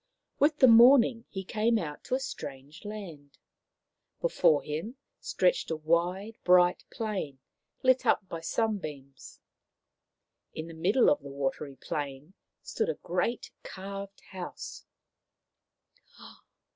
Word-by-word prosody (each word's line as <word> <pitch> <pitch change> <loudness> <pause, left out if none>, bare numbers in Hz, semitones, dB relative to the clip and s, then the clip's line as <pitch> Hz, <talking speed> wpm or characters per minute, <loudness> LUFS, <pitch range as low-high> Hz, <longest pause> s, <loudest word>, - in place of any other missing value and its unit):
With 295 +1 +3
the 260 - +7
morning 235 0 +7
he 190 -1 -5
came 225 +3 +1
out 150 -7 -5
to 255 - 0
a - - -1
strange 150 - -8
land. 175 -10 -9 0.8
Before 320 - +3
him 160 - -5 0.2
stretched - - +1
a 160 - 0
wide, 175 +7 -1
bright 180 0 +4
plain, 195 - -4 0.5
lit 260 0 +4
up 190 - +2
by 165 -2 -6
sunbeams. 155 - -4 1.2
In 160 +1 -5
the 165 - -9
middle 190 +10 +3
of 290 - +1
the - - -9
watery 140 +1 -3
plain 145 +4 -5 0.3
stood 445 +1 -2
a 480 - -1
great 180 +7 -2
carved 195 +1 -8
house. 185 -2 -8
185 Hz, 120 wpm, -29 LUFS, 155-230 Hz, 1.2 s, the